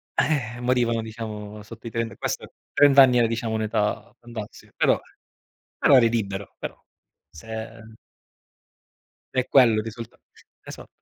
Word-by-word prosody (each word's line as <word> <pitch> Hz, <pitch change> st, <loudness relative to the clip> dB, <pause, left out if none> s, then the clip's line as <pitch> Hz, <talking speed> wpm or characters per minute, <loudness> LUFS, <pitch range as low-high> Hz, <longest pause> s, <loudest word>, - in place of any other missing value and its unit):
Eh, 120 Hz, -6 st, 0 dB
morivano, 120 Hz, -2 st, +1 dB
diciamo, 105 Hz, -2 st, -7 dB
sotto 115 Hz, +2 st, -11 dB
i -, -, -4 dB
30 115 Hz, -1 st, -3 dB
questo -, -, -4 dB, 0.2 s
30 140 Hz, -1 st, +7 dB
anni 125 Hz, -1 st, +4 dB
era, 115 Hz, -, +4 dB
diciamo, 115 Hz, 0 st, -2 dB
un'età 110 Hz, -1 st, -1 dB
fantastica. 115 Hz, -3 st, -9 dB
Però -, -, +3 dB, 0.8 s
però 140 Hz, -, +6 dB
eri 115 Hz, -2 st, +6 dB
libero, 100 Hz, -4 st, -3 dB
però -, -, -7 dB, 0.5 s
se 110 Hz, +5 st, -8 dB, 1.5 s
è 130 Hz, -1 st, 0 dB
quello 125 Hz, -5 st, +5 dB
il -, -, -2 dB
risultato. 115 Hz, 0 st, -9 dB, 0.4 s
Esatto. -, -, -10 dB
115 Hz, 130 wpm, -24 LUFS, 110-120 Hz, 1.5 s, 30